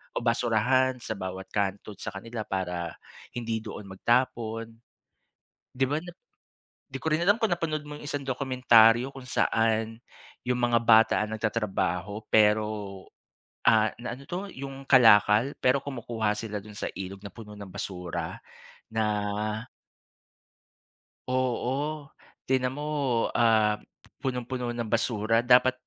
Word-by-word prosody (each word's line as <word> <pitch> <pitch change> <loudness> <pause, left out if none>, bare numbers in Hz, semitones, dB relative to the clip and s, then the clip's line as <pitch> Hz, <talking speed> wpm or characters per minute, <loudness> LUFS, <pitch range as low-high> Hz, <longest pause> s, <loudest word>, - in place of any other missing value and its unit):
o - - -2
basurahan 125 +2 +2
sa - - -5
bawat 95 0 -5
kanto 100 +1 -2
sa - - -5
kanila 115 +3 -5
para 90 -3 -3 0.4
hindi 115 -2 -2
doon 105 - -7
magtapon. 115 +1 0 1.0
'Di 135 - +1
ba, 145 - 0
na 175 +1 -10 0.8
'di 135 - -6
ko - - -2
rin 155 - +2
alam 205 +3 +5
kung 225 - +2
napanood 155 -3 -1
mo 150 - -7
'yong - - -11
isang 145 - -2
dokumentaryo 125 -3 +4
kung 135 -2 -10
saan, 110 -1 +1 0.5
'yong 125 0 0
mga 120 -1 +3
bata 115 -1 +6
ang 110 - -6
nagtatrabaho, 105 -3 -1
pero, 105 0 +5 1.0
ah, 110 -1 +5
na 120 0 -4
ano 140 - -13
'to, 190 +3 -4
'yong 135 0 -8
kalakal 115 0 +6
pero 130 +2 +3
kumukuha 115 -5 -2
sila 105 -2 -4
do'n 105 0 -12
sa - - -2
ilog 95 0 -6
na 100 - -8
puno 105 -3 -10
ng 100 -1 -9
basura. 85 -3 -5 0.5
Na 110 0 0 2.2
Oo. 130 +4 -1 0.4
Tingnan 130 0 0
mo, 150 - -4 0.5
ah, 110 -2 +3 0.4
punong-puno 125 -2 -3
ng 120 0 -3
basura. 115 0 +1
Dapat 125 +1 +5
115 Hz, 130 wpm, -27 LUFS, 105-130 Hz, 2.2 s, bata